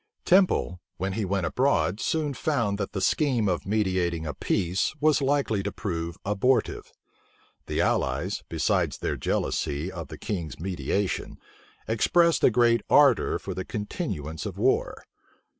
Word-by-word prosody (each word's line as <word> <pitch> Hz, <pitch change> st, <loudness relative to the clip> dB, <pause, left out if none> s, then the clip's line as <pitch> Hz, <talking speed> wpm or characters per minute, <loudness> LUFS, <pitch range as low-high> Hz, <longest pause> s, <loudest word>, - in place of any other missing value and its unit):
Temple, 180 Hz, -, +3 dB, 0.2 s
when 95 Hz, +1 st, -2 dB
he 110 Hz, 0 st, -1 dB
went 95 Hz, -1 st, -1 dB
abroad, 115 Hz, -, +1 dB
soon 150 Hz, 0 st, -1 dB
found 115 Hz, -9 st, -1 dB
that 100 Hz, -, -3 dB
the 95 Hz, -, -2 dB
scheme 125 Hz, -3 st, +2 dB
of 90 Hz, 0 st, -1 dB
mediating 95 Hz, -6 st, 0 dB
a 75 Hz, -, -3 dB
peace 95 Hz, -, -1 dB
was 150 Hz, -1 st, +3 dB
likely 135 Hz, -7 st, +1 dB
to 100 Hz, +1 st, -3 dB
prove 85 Hz, -4 st, -4 dB
abortive. 105 Hz, +6 st, 0 dB, 0.8 s
The -, -, 0 dB
allies, -, -, 0 dB
besides -, -, 0 dB
their -, -, -2 dB
jealousy 75 Hz, +6 st, -2 dB
of 85 Hz, -3 st, -7 dB
the 75 Hz, -, -9 dB
king's 85 Hz, -, -5 dB
mediation, 95 Hz, +2 st, -2 dB, 0.5 s
expressed 165 Hz, +8 st, +3 dB
a -, -, +7 dB
great 115 Hz, 0 st, +3 dB
ardor 140 Hz, -6 st, +5 dB
for -, -, -6 dB
the 95 Hz, -, -4 dB
continuance 95 Hz, -, -4 dB
of -, -, -7 dB
war. -, -, 0 dB
100 Hz, 140 wpm, -26 LUFS, 90-130 Hz, 0.8 s, a